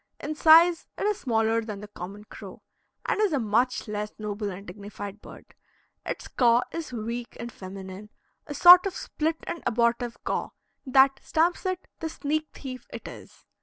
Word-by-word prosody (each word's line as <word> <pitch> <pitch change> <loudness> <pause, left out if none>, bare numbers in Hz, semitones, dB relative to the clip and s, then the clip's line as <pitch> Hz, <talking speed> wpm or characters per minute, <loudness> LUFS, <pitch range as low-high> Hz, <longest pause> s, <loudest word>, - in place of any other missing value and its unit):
In 300 - -4
size 330 +2 +6
it - - -2
is 420 0 0
smaller 225 -2 +1
than 215 -3 -6
the 210 - -9
common 200 +1 -9
crow, - - -12 0.4
and - - 0
is 410 -6 +2
a 285 - +2
much 235 +3 0
less 210 0 -4
noble 210 -1 -4
and 195 +1 -8
dignified 205 +1 -8
bird. - - -14 0.5
Its - - -5
caw 240 -1 +3
is 330 -4 -5
weak 235 +1 -5
and 235 +1 -6
feminine 190 +1 -9 0.4
a 290 - -6
sort 355 +4 +9
of 380 - -5
split 320 +1 -2
and 340 - -5
abortive 235 +1 0
caw, - - -2 0.4
that 270 +1 +5
stamps 345 +4 +1
it 370 0 -3
the 325 - -3
sneak 310 0 -2
thief 255 -2 -8
it - - -8
is. - - -12
240 Hz, 170 wpm, -26 LUFS, 210-315 Hz, 0.5 s, sort